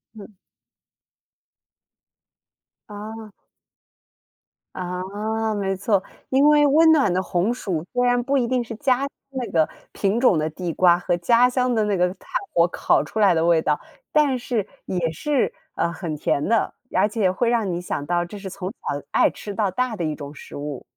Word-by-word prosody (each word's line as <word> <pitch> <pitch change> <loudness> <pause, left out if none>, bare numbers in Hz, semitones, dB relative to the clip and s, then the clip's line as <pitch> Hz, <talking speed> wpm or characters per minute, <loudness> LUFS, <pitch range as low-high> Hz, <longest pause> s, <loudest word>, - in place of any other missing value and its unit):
嗯。 210 0 -12 2.6
哦。 215 +1 -8 1.4
啊， 205 +5 -3
没 195 -2 -1
错， 200 0 +1 0.3
因 275 +3 +4
为 295 -1 +6
温 320 +3 +6
暖 270 - +3
的 185 - +1
红 185 +5 0
薯 175 -9 -3
虽 245 0 +2
然 245 0 +3
不 275 +2 +1
一 240 -2 +1
定 250 -1 0
是 225 - -7
家 255 +1 +2
乡 280 - -1 0.2
那 250 -6 -4
个 160 -2 +3 0.2
品 200 +3 0
种 225 -10 +4
的 155 +1 0
地 170 +2 -4
瓜 175 -1 +5
和 175 0 0
家 235 +8 +4
乡 250 -1 +1
的 215 - +2
那 205 -2 0
个 180 0 +3
炭 190 - -22 0.3
火 170 0 +4
烤 - - +2
出 220 - -5
来 200 -4 +5
的 165 0 +1
味 170 -2 +4
道， 150 -1 0 0.3
但 290 -4 +3
是 235 -5 -2 0.2
也 170 -3 -1
是， 280 - 0 0.2
呃， 170 - 0
很 165 -2 -5
甜 145 0 0
的， 230 0 +1 0.2
而 - - +4
且 210 -4 +1
会 230 +5 0
让 225 -5 +1
你 175 0 -2
想 145 -5 -4
到 175 +1 +1
这 190 +4 -8
是 190 -1 -6
从 185 0 -5
小 145 -10 -5
爱 - - +4
吃 205 - -8
到 200 -1 0
大 250 -1 -1
的 170 - -2
一 155 -1 -2
种 145 0 -8
食 - - -11
物。 145 -2 -6
205 Hz, 195 characters per minute, -23 LUFS, 175-240 Hz, 2.6 s, 为